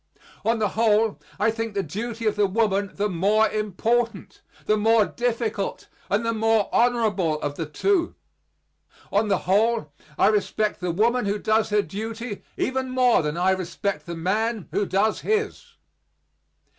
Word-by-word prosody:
On 230 +1 +2
the 210 -2 +1
whole, 220 0 +2 0.2
I 215 +2 +3
think 225 -1 -4
the 195 - 0
duty 225 +7 -5
of 215 - +2
the 205 -1 +3
woman 200 -1 +1
the 205 +1 0
more 205 +4 +2
important, 215 +1 -1 0.2
the 215 - +3
more 220 0 +4
difficult, 225 -4 -2 0.2
and 210 +3 +1
the 230 - +1
more 225 -1 +2
honorable 215 -10 +2
of 145 - -2
the 160 +1 -5
two; 345 - 0 1.0
on 210 +2 +2
the 195 -2 +2
whole 205 -4 +1 0.2
I - - +4
respect 210 0 0
the 180 - -2
woman 225 +6 +1
who 200 +1 0
does 220 +1 +1
her 210 -1 +2
duty 225 +2 -6 0.2
even 260 0 -1
more 255 -1 +3
than 150 +1 -3
I 185 +2 +3
respect 190 +2 -3
the 170 - -4
man 215 +4 -1
who 205 - 0
does 210 +3 +1
his. 435 +2 -2
215 Hz, 155 wpm, -24 LUFS, 195-230 Hz, 1.0 s, more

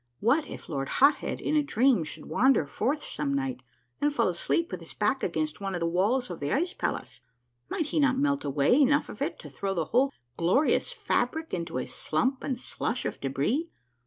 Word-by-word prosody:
What 270 +8 +2
if - - -9
Lord 135 -3 -3
Hot 280 +3 +7
Head - - -3
in 305 - -1
a 300 - +5
dream 255 - +3
should 150 - -7
wander 230 - +3
forth 260 - -1
some 140 -2 -2
night 135 -2 -2 0.4
and 295 - +3
fall 235 -7 +2
asleep 255 - 0
with 185 - -4
his 165 - -10
back 215 +6 +1
against 155 0 -2
one 195 -1 -2
of - - -2
the 170 - 0
walls 195 +8 +1
of 170 - -6
the 145 0 -2
ice 350 +5 +1
palace? - - -3 0.5
Might 325 - -1
he 305 - -1
not 270 -3 +3
melt 285 0 +1
away 140 - +2
enough 290 +2 +3
of - - -9
it - - -1
to - - -10
throw 195 -1 -3
the 165 -3 0
whole 260 - +2 0.3
glorious 190 - +2
fabric 320 - -1
into 170 -5 -3
a 130 - -2
slump 255 - -1
and 260 - -1
slush 245 0 -3
of - - -4
debris? 145 - 0
230 Hz, 210 wpm, -28 LUFS, -, 0.5 s, Hot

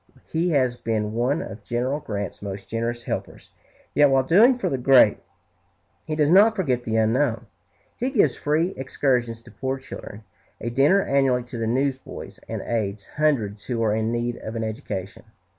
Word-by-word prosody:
He 170 +3 +1
has 130 -6 +2
been 110 -2 -2
one 125 +7 0
of 105 0 -9
General 125 +6 -1
Grant's 100 -8 -5
most 100 -1 -6
generous 115 +2 -3
helpers; - - -6 0.4
yet 145 -1 +5
while 135 -1 +3
doing 220 - +5
for 250 - -2
the 135 - -1
great, 125 -4 +5 0.9
he 155 - -2
does 150 0 +2
not 210 +4 +6
forget 130 - 0
the 110 - -1
unknown. 115 +2 +1 0.5
He 250 - -1
gives 200 - +3
free 160 +5 0
excursions 125 -3 -1
to 120 - -15
poor 130 +4 -3
children, 115 -5 -10 0.4
a 120 - -4
dinner 145 +11 +4
annually 135 -3 +2
to 125 0 -8
the 115 - -1
newsboys, 130 +2 -3
and - - -4
aids 105 -4 -2
hundreds 115 -10 0
who 115 -2 -1
are 105 -2 +2
in 110 +1 0
need 120 0 -2
of 110 -1 -7
an 115 - -2
education. 100 -3 -5
125 Hz, 175 wpm, -24 LUFS, 110-145 Hz, 0.9 s, not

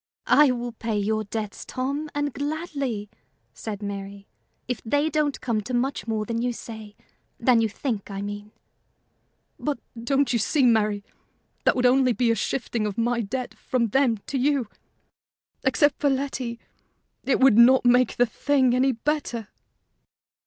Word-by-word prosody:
"I 295 -1 +6
will 240 -1 -2
pay 225 -1 -3
your 215 +1 0
debts, 210 0 -5
Tom, 280 +4 -3
and 290 -2 -1
gladly," 285 -8 -3 0.5
said 210 -2 -6
Mary, 200 0 -6 0.4
"if 250 -2 -3
they 290 +7 +1
don't 300 -2 0
come 230 -4 0
to 245 +4 -4
much 260 0 -1
more 215 -1 -1
than 230 +1 -2
you 245 0 0
say 220 -3 -9 0.4
than 240 -1 +4
you 225 - +1
think, 220 -2 -4
I 195 -1 -5
mean." 205 +1 -6 1.1
"But, 295 -2 -2 0.3
don't 275 +1 +1
you 235 - +2
see, 275 +6 +1
Mary, 210 -3 +2 0.6
that - - +4
would 250 - 0
be - - +7
only 250 -2 +3
a - - +4
shifting 230 -2 -2
of 205 - -5
my 235 +1 +1
debt 245 +4 -4
from 235 -3 -1
them 255 -1 +2
to 275 - -2
you? 275 -3 +1 1.0
Except 285 +1 +2
for 290 - +2
Letty, 265 -3 -2 0.6
it 275 - +1
would 260 -4 +6
not 255 +2 +7
make 245 +1 +4
the 245 - +5
thing 260 +1 +1
any 260 +1 +3
better." 240 -4 -2
245 Hz, 160 wpm, -25 LUFS, 220-270 Hz, 1.1 s, be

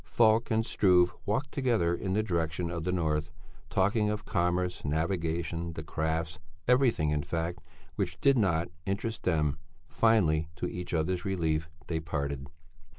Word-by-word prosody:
Falk 110 0 +3
and 110 0 +2
Struve 90 -4 +4
walked 135 +7 0
together 115 -11 +1
in 95 +2 -2
the 105 +2 +2
direction 85 -3 -1
of 85 -1 -4
the 90 - +1
north, 80 -3 0 0.4
talking 105 +2 +2
of 105 0 -3
commerce, 90 -1 0
navigation, 85 +1 -1
the 80 - -6
crafts, 80 0 -2 0.3
everything 120 - +3
in 75 -1 +1
fact 85 +4 -3 0.4
which - - -2
did 140 -1 +5
not 85 -8 +2 0.2
interest 110 +3 -2
them; 75 -5 +1 0.3
finally, 85 -9 +3
to - - -3
each 90 0 -5
other's 90 +2 0
relief, 80 -5 0 0.2
they 80 +1 -2
parted. 70 -3 -3
85 Hz, 150 wpm, -30 LUFS, 80-105 Hz, 0.4 s, did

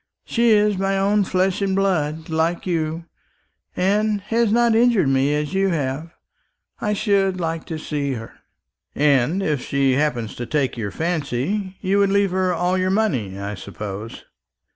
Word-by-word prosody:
She 235 0 +2
is 210 -2 +3
my 195 0 0
own 200 +1 +2
flesh 185 +1 0
and 195 -1 0
blood, 160 -5 0
like 165 +2 -1
you, 165 -2 -2 0.7
and 205 +3 +1
has 225 +2 +1
not 235 0 +3
injured 225 - +3
me 135 +2 +2
as 150 +3 -2
you 195 0 +2
have. 150 -1 -2 0.7
I 210 - 0
should 195 -3 +1
like 165 -1 -3
to 160 - -5
see 145 -3 -2
her." 115 -2 -7 0.6
"And 145 +5 +2
if 150 -7 0
she 140 -1 +1
happened 125 -5 0
to 120 - -5
take 145 -4 0
your 110 -4 -3
fancy, 170 - -2
you 195 +1 +1
would 200 -1 +3
leave 200 -1 +2
her 185 0 +1
all 180 +2 0
your 185 0 +1
money, 140 - 0
I 100 +1 -4
suppose?" 105 +2 -7
175 Hz, 165 wpm, -21 LUFS, 140-195 Hz, 0.7 s, is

